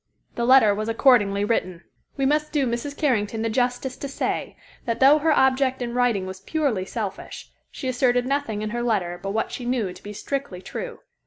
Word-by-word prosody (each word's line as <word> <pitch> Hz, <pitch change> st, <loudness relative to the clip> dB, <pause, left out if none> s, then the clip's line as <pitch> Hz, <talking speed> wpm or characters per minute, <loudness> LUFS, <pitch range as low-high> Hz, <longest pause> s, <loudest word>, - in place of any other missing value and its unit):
The 235 Hz, -, -1 dB
letter 250 Hz, -5 st, +6 dB
was 215 Hz, +2 st, -3 dB
accordingly 215 Hz, -5 st, +3 dB
written. 185 Hz, -5 st, -1 dB, 0.3 s
We 270 Hz, -, +1 dB
must 300 Hz, +2 st, +1 dB
do 290 Hz, -3 st, +1 dB
Mrs. 240 Hz, +4 st, -3 dB
Carrington 225 Hz, -6 st, 0 dB
the 225 Hz, -, -1 dB
justice 250 Hz, +2 st, -1 dB
to 280 Hz, -, -5 dB
say 275 Hz, -, -3 dB, 0.3 s
that 230 Hz, -1 st, -2 dB
though 280 Hz, +3 st, +6 dB
her 320 Hz, +2 st, +2 dB
object 265 Hz, -2 st, +3 dB
in 240 Hz, -1 st, -4 dB
writing 240 Hz, -6 st, +1 dB
was 190 Hz, 0 st, -7 dB
purely 235 Hz, -4 st, -1 dB
selfish, 200 Hz, -2 st, -6 dB, 0.2 s
she 265 Hz, -, -6 dB
asserted 245 Hz, -1 st, +2 dB
nothing 255 Hz, -6 st, -1 dB
in 215 Hz, -, -3 dB
her 240 Hz, +1 st, -2 dB
letter 190 Hz, -7 st, -1 dB
but 195 Hz, -, -4 dB
what 220 Hz, +3 st, -1 dB
she 250 Hz, -, -6 dB
knew 240 Hz, -7 st, -1 dB
to -, -, -15 dB
be 205 Hz, -, -8 dB
strictly 240 Hz, -1 st, -4 dB
true. 485 Hz, -, -7 dB
240 Hz, 195 wpm, -24 LUFS, 210-270 Hz, 0.3 s, letter